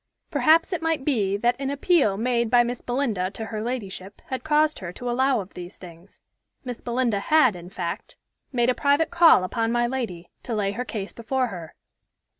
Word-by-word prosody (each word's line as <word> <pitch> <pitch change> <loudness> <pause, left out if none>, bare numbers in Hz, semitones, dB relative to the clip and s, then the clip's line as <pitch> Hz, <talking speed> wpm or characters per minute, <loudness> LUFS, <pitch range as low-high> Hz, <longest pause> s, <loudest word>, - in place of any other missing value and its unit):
Perhaps 330 +4 +4
it 345 - -2
might 325 -4 -1
be 205 -9 +1
that 240 +3 +1
an 275 -1 -2
appeal 280 - +2
made 235 0 0
by 240 0 +5
Miss 245 +1 -4
Belinda 240 -8 -1
to 220 +2 -7
her 220 -1 -5
ladyship 205 -5 -5
had 260 - -4
caused 310 0 +2
her 175 -3 -6
to 245 +7 -7
allow 255 0 +2
of 190 - -12
these 180 +1 -9
things. 175 +1 -14 0.4
Miss 245 -2 -5
Belinda 240 -3 0
had, 260 -1 +4
in 175 0 -10
fact, 175 -2 -5 0.4
made 245 -1 +2
a - - 0
private 285 +5 +1
call 335 - +6
upon 225 +4 -1
my 240 0 +2
lady, 235 -9 -4
to 235 - -4
lay 200 -2 0
her 245 +5 -4
case 205 -5 -5
before 255 +2 -1
her. 170 -5 -9
240 Hz, 195 wpm, -24 LUFS, 200-265 Hz, 0.4 s, call